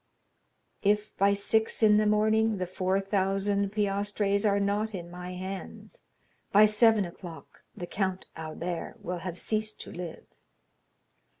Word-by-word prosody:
"_If 210 +1 +1
by 200 +1 +3
six 220 +3 0
in 210 -1 +6
the 215 0 +3
morning 215 +1 +3
the 185 - -2
four 185 +1 0
thousand 195 0 0
piastres 205 0 0
are 200 0 +2
not 205 +2 0
in 175 -2 -7
my 180 +1 -7
hands, 190 - -7 0.5
by 210 +2 +7
seven 215 -1 +4
o'clock 170 -1 -11 0.2
the 175 - -4
Count 190 0 -2
Albert 165 +2 -5
will 180 0 -3
have 175 0 -6
ceased 215 +1 -2
to - - -9
live_." 175 -2 -7
200 Hz, 135 wpm, -28 LUFS, 185-210 Hz, 0.5 s, by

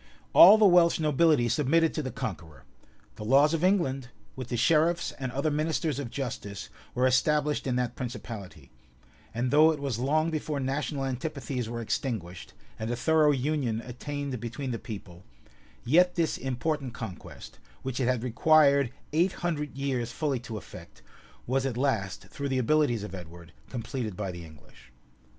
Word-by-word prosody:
[] - - -33
All 200 +5 +10
the 215 - +5
Welsh 175 -3 +5
nobility 150 -4 +3
submitted 150 +7 +2
to 155 - -2
the 130 - -4
conqueror; 85 - -6 0.5
the - - -6
laws 140 +7 +4
of 165 +1 -1
England, 135 -10 +1 0.3
with 130 -2 -6
the 120 - -3
sheriffs 165 +6 +2
and 130 -2 -3
other 140 +4 -1
ministers 155 -1 -1
of 135 -4 -4
justice, 115 -7 -5 0.3
were 125 +1 +2
established 150 +3 +2
in 125 - 0
that 125 -1 -1
principality; 115 -5 -7 0.6
and 120 +2 -2
though 155 +2 +6
it 155 - -4
was 135 -5 -3
long 155 +5 +1
before 155 -2 -2
national 135 +1 -2
antipathies 130 -2 -4
were 115 0 -4
extinguished, 105 -7 -4 0.3
and 110 +1 -3
a 120 - -1
thorough 155 +3 +3
union 135 -4 0
attained 135 +2 -5
between 120 +4 -5
the 115 - -3
people, 95 -5 -9 0.6
yet 180 +8 +4
this 165 -3 +1
important 135 0 -3
conquest, 105 -7 -9 0.2
which 130 -1 -3
it 125 - +1
had 125 -2 0
required 140 +1 +4 0.2
eight 175 +4 +2
hundred 150 -5 -2
years 130 -4 -2
fully 140 0 -1
to 115 -2 -7
effect, - - -12 0.4
was 130 +2 0
at 130 -3 -2
last, 110 -9 -1
through 140 0 -4
the 130 - 0
abilities 130 -3 +2
of 105 -3 -7
Edward, 85 -2 -10 0.2
completed 115 -4 -4
by 100 -3 -3
the 85 -1 -9
English. 70 -4 -17
130 Hz, 165 wpm, -28 LUFS, 115-150 Hz, 0.6 s, All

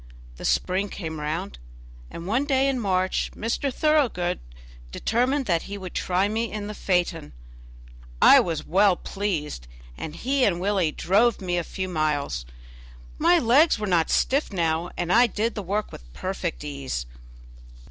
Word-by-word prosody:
The - - -7
spring 190 +2 +1
came 160 -5 -6
round, 155 - -4 0.5
and 170 - -8
one 235 +9 +1
day 270 -1 +2
in 270 -2 0
March 185 -3 0
Mr. 235 +5 -1
Thoroughgood 250 - +1 0.5
determined 255 - 0
that 170 -5 +1
he 200 - -5
would 185 -2 -8
try 185 +2 +1
me 225 +2 -2
in 210 -1 -4
the 210 - -5
phaeton. 180 - -1 0.9
I - - +8
was 160 -3 -2
well 195 +1 +4
pleased, 165 - -4 0.3
and 155 - -7
he 270 +5 0
and 180 -7 +2
Willie 190 -4 +1
drove 210 +9 +2
me 180 -2 -2
a 175 - 0
few 185 +3 -5
miles. 145 - -1 0.7
My 345 +3 +5
legs 285 +3 +4
were 210 - -3
not 175 -5 +2
stiff 275 -1 +1
now, 165 -2 0
and 175 +1 0
I 240 +2 +6
did 225 +1 -1
the 210 - -4
work 205 +3 -2
with - - -12
perfect 185 - -4
ease. 140 - -4
190 Hz, 155 wpm, -25 LUFS, 165-230 Hz, 0.9 s, I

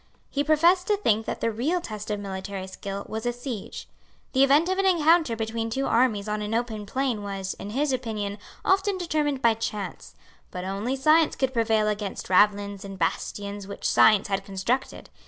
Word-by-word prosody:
He 285 - 0
professed 335 +5 +4
to 415 - +2
think 220 - +1
that - - -4
the 230 - +1
real 280 +12 0
test 215 -9 -7
of 210 -1 -1
military 195 -1 -5
skill 195 +1 -6
was 220 +2 -4
a - - +2
siege. 240 -3 -7 0.5
The 265 0 +5
event 285 +5 +5
of 375 +1 0
an 390 - +2
encounter 330 -6 +4
between 225 0 -3
two 270 +4 -1
armies 225 -4 +2
on 210 0 -2
an 210 +2 -2
open 225 -3 -2
plain 255 -2 -1
was, 195 -1 -4
in 200 - -6
his 275 +5 0
opinion, 215 -5 -3 0.3
often 390 +1 +2
determined 300 -6 -1
by 230 -1 +5
chance; 210 -4 -5 0.3
but 180 - -6
only 200 +7 -2
science 310 +4 +4
could 265 -1 -1
prevail 220 -2 +2
against 210 -3 -3
ravelins 200 +1 +3
and 195 -1 -8
bastions 200 +3 -3
which 200 - -4
science 215 -2 +5
had 195 -1 -1
constructed. 200 +7 -3
225 Hz, 185 wpm, -26 LUFS, 200-275 Hz, 0.5 s, The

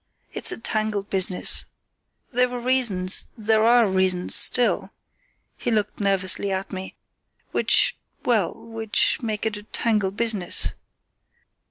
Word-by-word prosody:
It's - - -4
a - - -5
tangled 215 -3 -2
business. 185 -1 +2 0.7
There 250 +1 +3
were 245 0 -5
reasons, 235 -7 +1
there 220 0 +1
are 235 0 +4
reasons 185 -1 +1
still"—he 255 - -1
looked 210 -2 -1
nervously 195 0 +1
at 190 +1 -4
me—"which—well, 190 +2 -2
which 225 +1 0
make 215 -3 -4
it 215 -2 -2
a - - -9
tangled 210 -2 -1
business." 215 -6 +2
215 Hz, 110 wpm, -23 LUFS, 190-230 Hz, 0.7 s, are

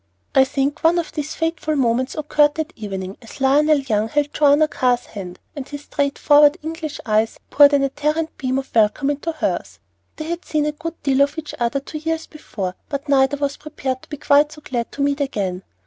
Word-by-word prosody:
I 265 - +6
think 280 +3 -2
one 330 +2 +4
of 340 - -2
these 300 0 -4
fateful 325 -1 -1
moments 255 -1 +1
occurred 295 -1 +2
that 315 +2 -4
evening, 195 -4 -6
as 225 +4 -12
Lionel 295 +3 +4
Young 225 -6 0
held 290 +3 0
Joanna 295 +1 +4
Carr's 245 -4 +1
hand, 185 -4 -8 0.2
and 280 -3 -6
his 290 0 -7
straight 280 -1 -1
forward 295 +1 +5
English 320 -1 -5
eyes 220 0 +1
poured 290 0 +7
an 280 -1 +4
ardent 300 +4 -1
beam 260 -1 -1
of 270 - -5
welcome 230 +6 +3
into 290 +3 -3
hers. 315 - -3 0.4
They 310 - -6
had 340 +2 -4
seen 300 -1 0
a 300 - 0
good 330 +3 -7
deal 275 -1 +2
of 285 +3 +2
each 305 -2 -6
other 240 +3 0
two 305 +3 -7
years 325 +1 -2
before, 200 - -6 0.2
but 280 0 -4
neither 270 0 +3
was 280 0 -2
prepared 270 -4 -4
to - - -18
be 295 - -6
quite 290 +1 +4
so 305 - -12
glad 240 -2 -3
to 280 - -2
meet 285 +1 0
again. 195 -9 -2
285 Hz, 210 wpm, -21 LUFS, 260-305 Hz, 0.4 s, poured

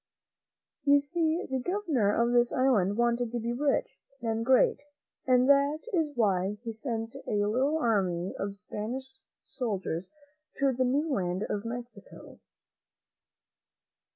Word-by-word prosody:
You 285 0 +6
see 320 +4 -1
the 265 0 -1
Governor 305 - 0
of 235 +3 +2
this 240 0 +3
island 215 -7 +2
wanted 235 0 +1
to 240 - -2
be 235 +1 -2
rich 275 0 0 0.2
and 225 -1 -1
great, 255 +1 +4 0.5
and 255 0 +4
that 280 +2 +4
is 325 -4 +2
why 200 -2 +1
he 230 -2 -4
sent 225 -1 -4
a 205 -1 +1
little 260 +9 +1
army 190 - 0
of 200 0 -4
Spanish 255 +6 -6 0.3
soldiers 190 - -3 0.5
to 275 -1 +2
the 255 +1 +1
new 280 +5 +1
land 185 -1 -1
of 205 +1 -3
Mexico. 245 - -9
240 Hz, 130 wpm, -29 LUFS, 210-275 Hz, 0.5 s, You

